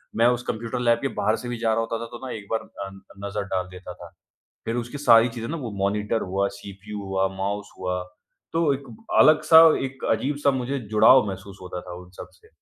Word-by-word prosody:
मैं 115 +1 +4
उस 120 0 +1
computer 115 +3 -3
lab 120 -1 +3
के 135 - 0
बाहर 110 +1 +2
से 120 - -7
भी 120 - -3
जा 115 -1 0
रहा 115 - +1
होता 115 0 -3
था 115 - -5
तो 120 - -8
ना, 130 - -5
एक 100 -2 -9
बार 115 - +1
अ 100 - -8
अ, - - -8 0.4
नज़र 100 0 -3
डाल 90 -1 -1
देता 90 -1 -9
था, - - -12 0.6
फिर 115 +1 -2
उसकी 120 +4 -4
सारी 120 -3 +6
चीज़ें 115 -1 -6
ना 165 - -3
वो 125 -7 -5
मॉनिटर 105 +3 0
हुआ, 100 +1 +1
सीपीयू 100 +1 -8
हुआ, 95 0 0
माउस 100 +1 -3
हुआ, 90 -1 -2 0.5
तो 165 -3 +2
एक 135 +1 -7 0.4
अलग 155 0 +6
सा, 160 +1 +8 0.2
एक 135 0 -7
अजीब 140 +2 0
सा 140 - +6
मुझे 130 +1 -2
जुड़ाव 110 +2 +6
महसूस 95 0 -8
होता 90 -1 -6
था 90 -1 -9
उन 90 - -17
सब - - -8
से। - - -23
115 Hz, 235 wpm, -24 LUFS, 100-125 Hz, 0.6 s, सा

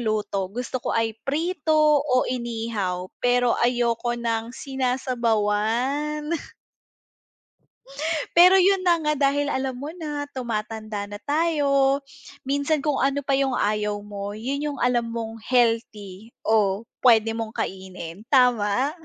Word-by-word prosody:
luto, 210 -4 -1
gusto 245 +4 -4
ko - - -3
ay 225 -1 +1 0.2
prito 325 +2 -1 0.3
o 255 -3 +2
inihaw, 225 -7 -3
pero 245 0 +3
ayoko 240 0 +1
ng 230 0 -2
sinasabawan. 255 +2 -1 2.1
Pero 360 +2 +8
'yun 380 0 +3
na 345 -1 +4
nga 300 -1 +1
dahil 285 +1 +2
alam 265 -1 -1
mo 285 +3 -6
na 295 -4 -4
tumatanda 215 -4 -4
na 205 - -6
tayo, 285 -3 +2 0.5
minsan 285 +2 0
kung 295 -3 0
ano 275 +2 +1
pa 275 - +1
'yung 270 -2 +1
ayaw 210 0 0
mo 205 0 -6
'yun 280 +6 -2
'yung 285 - -8
alam 240 -1 +2
mong 225 -1 -5
healthy 225 -5 0 0.2
o 210 -1 +2 0.2
puwede 225 -3 +5
mong 225 0 -5
kainin, 185 0 -6
tama? 250 0 +3
240 Hz, 125 wpm, -24 LUFS, 215-280 Hz, 2.1 s, Pero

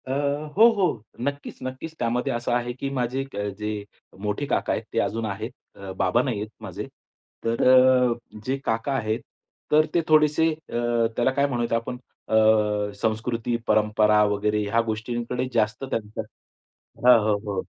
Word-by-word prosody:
अ, - - -3 0.5
हो, 225 +2 +9
हो, 200 -3 +3 0.4
नक्कीच, 140 0 -4
नक्कीच. 130 +5 -6
त्यामध्ये 120 +1 0
असं 120 +1 -2
आहे 120 0 0
की 135 +2 -4
माझे 130 0 -1
क - - -11 0.2
जे 105 0 -3 0.5
मोठे 105 +7 -2
काका - - 0
आहेत, - - -2
ते - - +1
अजून 115 0 -1
आहेत. 100 -2 -4 0.2
अ, 100 -1 -8
बाबा 95 +6 +2
नाही 125 -6 -2
आहेत 105 +1 -5
माझे. - - -5 0.6
तर 115 0 0 0.5
अ, - - +3 0.3
जे 135 +1 0
काका 115 +5 0
आहेत, 110 -3 -1 0.5
तर 155 +1 +5
ते 170 - +3
थोडेसे 155 +1 +4
अ, 155 -4 -9 0.4
त्याला 120 +2 +2
काय 140 +1 +2
म्हणू 120 -3 -1
आपण 115 +2 -3 0.3
अ, 110 - 0 0.7
संस्कृती, 115 +1 -1
परंपरा 105 0 +4
वगैरे 105 +1 +1
ह्या 105 +3 +2
गोष्टींकडे 120 +3 -3
जास्त 105 +1 0
त्यांचा 110 -5 -3 0.8
हो, 125 - +9
हो, 105 - +3 0.2
हो. 95 - -1
120 Hz, 160 wpm, -25 LUFS, 110-130 Hz, 0.8 s, हो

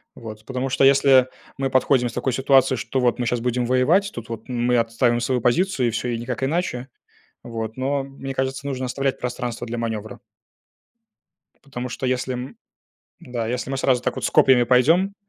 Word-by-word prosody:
Вот, 110 -2 -10
потому 130 0 -3
что, 130 - +1
если 135 -1 +5 0.3
мы 135 0 -1
подходим 130 -1 +2
с - - -11
такой 125 +1 -1
ситуации, 135 0 +3
что 130 +2 -2
вот 125 -2 +2
мы 120 - -1
щас 120 0 0
будем 125 +1 -1
воевать, 150 +11 +2
тут 120 -1 -8
вот 115 -1 -7
мы 125 0 +1
отстаиваем 120 +1 +1
свою 125 +1 0
позицию, 130 - +1
и - - 0
всё, 120 +3 -3
и 120 - -1
никак 120 +2 -4
иначе. 135 -4 -2 0.5
Вот. 115 -1 -5
Но 135 +1 -1
мне 135 0 -7
кажется, 135 +1 -3
нужно 130 -2 -3
оставлять 135 +1 -2
пространство 125 -1 -4
для 120 +1 -4
манёвра. 110 -2 -4 1.4
Потому 125 -3 -6
что 125 - -5
если 130 0 -1
м, 125 +2 -7 0.6
да, 120 -2 -4
если 125 +2 -3
мы 135 - -2
сразу 130 -2 +1
с - - -1
копьями 130 -2 +5
пойдём 160 +11 +3
125 Hz, 180 wpm, -22 LUFS, 120-135 Hz, 1.4 s, если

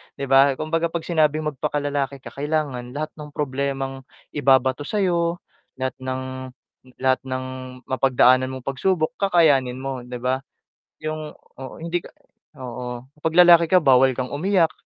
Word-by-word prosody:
'di 140 - -6
ba 135 +1 +6
kumbaga, 160 +3 -1
pag 170 0 -4
sinabing 155 -2 +1
magpaka 145 +1 -2
lalaki 140 -2 -2
ka - - -8
kailangan 140 -4 -3
lahat 155 +1 -3
ng 150 -1 -9
problemang 135 -1 -3 0.3
ibabato 130 0 +2
sa'yo 175 -4 0 0.4
lahat 130 0 -2
ng 130 0 -3 0.8
lahat 130 0 +3
ng 130 0 -3 0.4
mapagdaanan 130 0 +3
mong 130 - -7
pagsubok 160 - 0
kakayanin 155 -10 +3
mo 135 -1 -4
'di 125 0 -7
ba? 130 +1 0 0.6
'yong 155 0 -5 0.2
oo, 135 -1 -9
hindi 170 +1 -2
ka - - -11 0.5
oo 125 0 -6 0.2
pag 160 0 -1
lalaki 175 -1 +8
ka 185 - +7
bawal 130 -3 +5
kang 130 0 -3
umiyak 170 +1 +2
140 Hz, 145 wpm, -23 LUFS, 130-155 Hz, 0.8 s, lalaki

